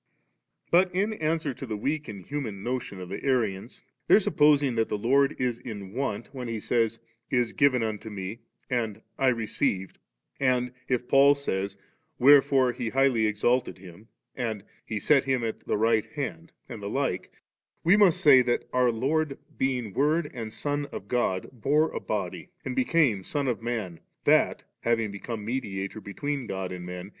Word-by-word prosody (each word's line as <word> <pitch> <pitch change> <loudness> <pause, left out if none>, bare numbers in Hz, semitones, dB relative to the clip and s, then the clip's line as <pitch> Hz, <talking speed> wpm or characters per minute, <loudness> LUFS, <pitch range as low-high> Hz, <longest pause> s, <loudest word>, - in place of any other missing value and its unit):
But 180 +2 +5
in 205 +4 +1
answer 155 -5 -1
to 135 - -8
the 110 -2 -3
weak 150 +7 -2
and 100 -4 -8
human 115 -9 -4
notion 120 -5 -3
of 90 -1 -8
the 100 - -6
Arians, 115 -8 -1 0.2
their - - +7
supposing 145 -3 +3
that 115 -1 0
the - - -1
Lord 135 +6 +3
is 125 -2 -1
in 100 -5 -8
want, 125 -2 -3
when 125 -2 -5
He 115 -1 -3
saj^ 115 +1 0 0.3
'Is 125 -3 +1
given 135 -4 +3
unto 110 0 -4
Me,' 100 +2 -6 0.3
and 110 -4 -2
* - - -34
I 135 - +3
received,* 110 -5 -1 0.4
and 125 -2 +1
if 125 -1 -1
Paul 140 +1 +6
says, 100 -8 -3 0.2
* 160 -1 -46
Where 140 +2 +8
fore 130 -2 +2
He 120 -1 -4
highly 130 -4 +3
exalted 120 +4 +1
Him,' 95 +3 -14 0.3
and 110 -5 -3 0.2
'He 110 - -2
set 140 +3 +3
EQm 130 -3 +1
at 110 - -5
the - - +1
right 110 0 +2
hand',' 160 +2 -5 0.2
and 115 -3 -8
the 100 - -4
like, 130 -8 -2 0.5
we 175 +4 +6
must 200 -5 +4
say 135 -4 +8
that 120 -1 0
our 125 -1 +3
Lord, 140 +5 0 0.2
being 125 -6 -1
Word 150 - +1
and 115 -4 -5
Son 145 +5 -2
of 100 - -7
God, 105 -7 0
bore 145 +6 +2
a - - -3
body, 100 - -4 0.2
and - - -3
became 160 - +2
Son 140 +7 -2
of 120 -3 -1
Man, 110 -8 -3 0.3
that^ - - +4 0.2
having 115 -2 0
become 105 +1 -6
Mediator 105 -4 -3
between 135 +6 -4
God 95 -2 -4
and 90 -1 -6
men. 90 +1 -7
120 Hz, 180 wpm, -27 LUFS, 105-140 Hz, 0.5 s, Where